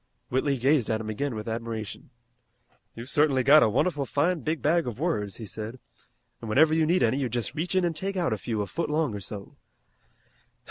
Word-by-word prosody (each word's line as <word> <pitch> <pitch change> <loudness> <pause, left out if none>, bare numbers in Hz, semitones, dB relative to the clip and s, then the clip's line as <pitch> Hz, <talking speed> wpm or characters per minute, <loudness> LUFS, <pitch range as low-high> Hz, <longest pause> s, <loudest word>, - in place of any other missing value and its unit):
Whitley 135 +2 +1
gazed 130 -1 +2
at 110 -1 0
him 110 -1 -4
again 135 +3 -2
with 110 0 -6
admiration. 115 -2 -5 0.9
"You've 115 +2 -8
certainly 145 -3 +3
got 150 +4 +7
a - - +4
wonderful 145 - 0
fine 165 +7 +1
big 155 +1 -2
bag 165 0 +2
of 120 - -4
words," 105 - -1
he 115 - -8
said, 110 +4 -6 0.6
"an' 115 - -6
whenever 155 +8 +5
you 160 -1 +2
need 175 -1 +3
any 120 +3 +2
you 130 -3 -1
just 120 +1 -2
reach 165 +5 -2
in 185 -1 +3
an' 170 - 0
take 195 +5 -2
out 170 -10 +1
a - - -2
few 110 -4 -2
a - - -4
foot 165 +11 -3
long 150 -5 0
or 100 - -4
so. 100 +1 -8
135 Hz, 215 wpm, -27 LUFS, 110-155 Hz, 0.9 s, got